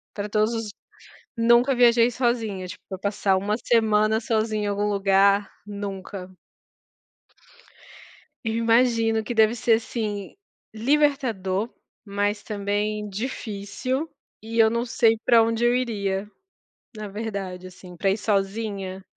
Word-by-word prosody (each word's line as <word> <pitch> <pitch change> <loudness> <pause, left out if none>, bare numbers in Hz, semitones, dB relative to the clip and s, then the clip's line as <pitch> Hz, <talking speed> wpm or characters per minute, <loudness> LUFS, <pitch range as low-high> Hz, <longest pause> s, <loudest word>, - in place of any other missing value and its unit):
Pra 205 0 -3
todos 215 +2 +1
os 225 -2 -3 0.7
nunca 235 +3 +4
viajei 235 -1 +5
sozinha, 225 -6 -1
tipo, 190 0 -9
passar 200 -1 +1
uma 205 +2 -1
semana 220 -2 +2
sozinha 220 -2 0
em - - -1
algum 205 +1 0
lugar, 200 0 +3 0.2
nunca. 195 -2 -6 2.1
Eu 225 -1 -1
imagino 230 -1 +2
que 240 - -4
deve 220 0 +4
ser, 235 0 +2
assim, 220 -3 -3 0.4
libertador, 235 -6 +1 0.4
mas 205 +1 -1
também 210 0 -2
difícil, 235 +5 -4 0.3
e 225 +1 -3
eu 220 0 +7
não 235 +1 -1
sei 225 -1 +3
pra 235 -2 +6
onde 230 +1 0
eu 240 - +3
iria, 205 -5 -2 0.7
na 215 -1 -6
verdade, 195 -3 -5
assim, 180 -1 -13
pra 195 +1 +1
ir 195 - 0
sozinha. 195 -2 -2
215 Hz, 120 wpm, -24 LUFS, 200-230 Hz, 2.1 s, eu